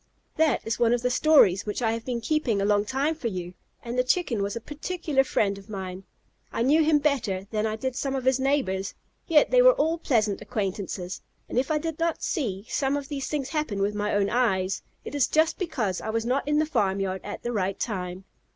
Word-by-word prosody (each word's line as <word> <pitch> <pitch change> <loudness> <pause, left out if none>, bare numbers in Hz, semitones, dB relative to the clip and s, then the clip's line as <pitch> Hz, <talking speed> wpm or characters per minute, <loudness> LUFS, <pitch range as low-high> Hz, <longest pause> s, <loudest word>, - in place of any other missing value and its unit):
That 310 -4 +2
is 225 0 -2
one 240 0 +4
of 240 - -4
the 250 - +1
stories 245 - +5
which 210 - -2
I 225 - +2
have 230 0 -3
been 245 -2 -2
keeping 245 -5 0
a 195 - +1
long 205 0 +2
time 275 +7 0
for 305 -7 -4
you, 180 -4 -5 0.3
and 240 +1 -3
the - - +4
Chicken 255 - +1
was 200 +2 -2
a - - -2
particular 295 +2 -1
friend 200 -6 0
of 200 - -17
mine. 190 -2 -6 0.5
I 230 - -1
knew 300 +5 +4
him 310 -1 +4
better 255 -11 0
than 215 0 0
I 215 - -2
did 260 +3 -3
some 270 +1 -2
of 260 -1 -3
his 260 0 +3
neighbors; 260 -9 0 0.3
yet 315 -3 +4
they - - +6
were - - +8
all 330 -8 +1
pleasant 215 -9 +1
acquaintances, 195 -4 -4 0.3
and - - 0
if 265 - -1
I 310 - +2
did 325 0 -4
not 335 0 -1
see 210 - -2
some 275 0 0
of 280 -1 -6
these 280 -2 -3
things 285 -3 -2
happen 300 -11 -2
with 200 +1 +1
my 210 0 -1
own 200 -1 +1
eyes, 195 -6 +1 0.2
it - - -6
is 285 -3 +2
just 315 +1 +2
because 250 - -2
I 220 - -5
was 225 +1 -1
not 265 +3 0
in 295 0 +2
the 310 - +3
farmyard 195 - 0
at - - -7
the 240 - -2
right 195 -3 -1
time. 185 -4 -3
240 Hz, 230 wpm, -26 LUFS, 200-290 Hz, 0.5 s, were